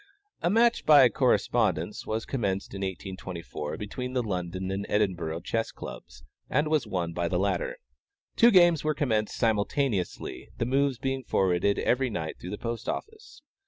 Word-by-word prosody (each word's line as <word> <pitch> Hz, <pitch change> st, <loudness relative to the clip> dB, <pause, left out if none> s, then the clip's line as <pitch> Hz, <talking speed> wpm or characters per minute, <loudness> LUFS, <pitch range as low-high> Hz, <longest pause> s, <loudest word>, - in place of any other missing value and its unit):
A -, -, +2 dB
match 230 Hz, +4 st, +3 dB
by 145 Hz, -4 st, +8 dB
correspondence -, -, +1 dB
was 110 Hz, +1 st, -2 dB
commenced 100 Hz, -7 st, -2 dB
in 100 Hz, -, -5 dB
1824, 95 Hz, -5 st, -5 dB
between 125 Hz, +5 st, -5 dB
the 125 Hz, -2 st, +1 dB
London 95 Hz, -2 st, -3 dB
and 100 Hz, +1 st, -2 dB
Edinburgh 90 Hz, -6 st, 0 dB
Chess 115 Hz, +5 st, -2 dB
Clubs, 65 Hz, 0 st, -10 dB, 0.3 s
and 150 Hz, +1 st, +1 dB
was 155 Hz, -3 st, +1 dB
won 85 Hz, -3 st, -2 dB
by 85 Hz, 0 st, -1 dB
the 90 Hz, -, 0 dB
latter. -, -, -1 dB, 0.6 s
Two 235 Hz, -, +7 dB
games 175 Hz, -6 st, +5 dB
were 155 Hz, 0 st, 0 dB
commenced 110 Hz, -7 st, 0 dB
simultaneously, 110 Hz, -2 st, -1 dB
the -, -, 0 dB
moves 135 Hz, +1 st, +1 dB
being 135 Hz, +1 st, -2 dB
forwarded 95 Hz, -1 st, +1 dB
every 130 Hz, +1 st, +1 dB
night 80 Hz, -8 st, -4 dB
through 90 Hz, -, -7 dB
the 105 Hz, -, -4 dB
post 115 Hz, -1 st, -4 dB
office. 435 Hz, -5 st, -7 dB
110 Hz, 160 wpm, -28 LUFS, 95-140 Hz, 0.6 s, by